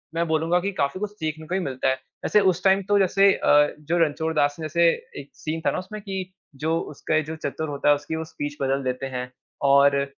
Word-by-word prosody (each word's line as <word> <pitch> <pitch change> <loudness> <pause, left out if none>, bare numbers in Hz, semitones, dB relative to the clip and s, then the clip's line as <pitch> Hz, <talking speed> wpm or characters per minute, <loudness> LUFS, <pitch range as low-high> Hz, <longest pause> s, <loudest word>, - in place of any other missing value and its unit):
मैं 170 0 0
बोलूँगा 160 +3 +2
कि 200 +3 -2
काफ़ी 140 0 -1
कुछ 210 0 -3
सीखने 155 -5 -5
को 180 - -4
ही - - +1
मिलता 135 -5 -2
है। - - +3 0.3
वैसे 210 - +4
उस 180 +2 -2
टाइम 195 0 +4
तो 205 - +4
जैसे 195 +1 +4
अ, 145 0 +3
जो 155 +3 -1
रणछोड़ 160 0 +1
दास 145 -1 +2
ने - - -5
जैसे 170 +2 +3 0.3
एक 140 - -10
सीन 160 +1 -4
था - - +3
ना - - -3
उसमें 205 +3 -8
कि 190 -2 -5 0.2
जो 160 +4 0
उसका 155 +2 -2
ये 155 - +4
जो 160 +2 -6
चतुर 155 0 -4
होता 140 0 0
है 145 - +7
उसकी 150 +2 -5
वो 160 - -3
स्पीच 145 -2 -6
बदल 135 0 0
देते 130 +1 -2
हैं 125 0 -4 0.4
और 140 0 +5
160 Hz, 240 wpm, -24 LUFS, 145-180 Hz, 0.4 s, है